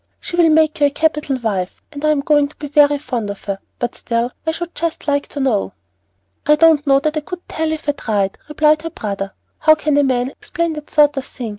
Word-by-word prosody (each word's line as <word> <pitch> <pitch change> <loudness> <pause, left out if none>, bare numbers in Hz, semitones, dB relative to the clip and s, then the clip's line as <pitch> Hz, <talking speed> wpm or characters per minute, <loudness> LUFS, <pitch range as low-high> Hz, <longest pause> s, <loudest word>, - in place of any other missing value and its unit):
She - - -6
will 340 -2 +5
make 310 -1 +3
you 290 - +5
a - - 0
capital 300 -2 0
wife, 200 -7 -3
and 285 0 -8
I'm 305 -2 +2
going 290 0 +3
to 290 - -19
be 300 - -7
very 290 0 +4
fond 245 -7 -4
of 200 - -7
her, 195 -1 -3 0.2
but 240 0 -2
still, 235 +1 -2 0.2
I - - +3
should 345 +1 -6
just 330 0 -3
like 285 -1 +1
to 285 - -7
know." 255 -7 0 0.7
"I 300 - +6
don't 315 -2 +4
know 275 0 +5
that 310 +1 -1
I - - 0
could 355 +3 -8
tell 320 0 -2
you 315 - 0
if 310 - -13
I - - +4
tried," 205 -8 -2
replied 305 0 +3
her 330 - -4
brother. 200 -7 -5 0.3
"How 310 0 +6
can 305 -1 0
a 290 - +4
man 255 -1 0
explain 335 +2 -3
that 300 -1 -8
sort 295 -2 +4
of 270 - -2
thing? 240 -4 -6
290 Hz, 245 wpm, -18 LUFS, 250-310 Hz, 0.7 s, I